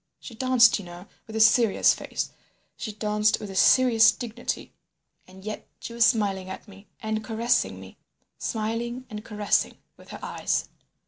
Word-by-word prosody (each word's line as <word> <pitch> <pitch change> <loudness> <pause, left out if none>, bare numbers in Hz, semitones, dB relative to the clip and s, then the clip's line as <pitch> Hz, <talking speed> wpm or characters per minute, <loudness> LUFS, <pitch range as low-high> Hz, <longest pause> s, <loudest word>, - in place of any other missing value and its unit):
She 240 - -10
danced, 245 -2 +4
you 200 - -9
know, 175 +1 -11 0.2
with 220 - -9
a - - -1
serious 220 0 +5
face; - - -5 0.4
she 220 - -5
danced 210 0 +1
with 205 - -7
a - - -9
serious 235 +1 +6
dignity, 240 -1 -5 0.5
and 190 +1 -15
yet 215 - -6
she 235 - -8
was 235 0 +4
smiling 195 -5 0
at 190 - -8
me 200 0 -15 0.2
and 220 0 -2
caressing 230 +2 0
me—smiling 235 +3 -6
and 210 0 -6
caressing 210 -2 0 0.2
with - - -17
her - - -8
eyes. - - -2
220 Hz, 155 wpm, -25 LUFS, 205-235 Hz, 0.5 s, serious